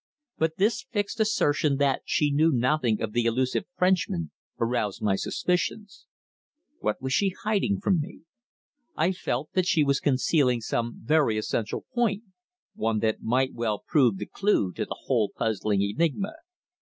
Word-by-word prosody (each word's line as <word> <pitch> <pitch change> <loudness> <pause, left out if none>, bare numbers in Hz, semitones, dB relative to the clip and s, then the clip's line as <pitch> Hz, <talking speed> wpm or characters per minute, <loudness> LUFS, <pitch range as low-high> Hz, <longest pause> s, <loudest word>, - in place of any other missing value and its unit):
But 160 0 0
this 210 +5 +2
fixed 205 0 -2
assertion 150 -9 +2
that 140 -1 +1
she 150 -1 +1
knew 155 +3 +4
nothing 125 -3 +1
of 110 - -2
the 120 -1 +1
elusive 130 - 0
Frenchman 180 - +1 0.3
aroused 115 -4 -1
my 100 -2 +2
suspicions. 180 - -2 0.7
What - - -1
was 130 0 -1
she 195 -2 +1
hiding 205 -1 +1
from 190 -3 +2
me? 180 +6 -9 0.7
I 165 +4 +2
felt 150 -6 -3
that 185 -1 +1
she 155 - +3
was 140 -1 +2
concealing 130 -2 +2
some 115 +1 -3
very 140 -4 +2
essential 110 +1 -2
point 225 -4 +1 0.5
one 110 0 -1
that 110 -1 0
might 130 +3 +1
well 115 -3 -1
prove 125 -9 +3
the - - -4
clue 195 - +1
to - - -3
the - - -6
whole 115 -6 +1
puzzling 105 -2 0
enigma. 165 - -1
140 Hz, 155 wpm, -26 LUFS, 115-180 Hz, 0.7 s, knew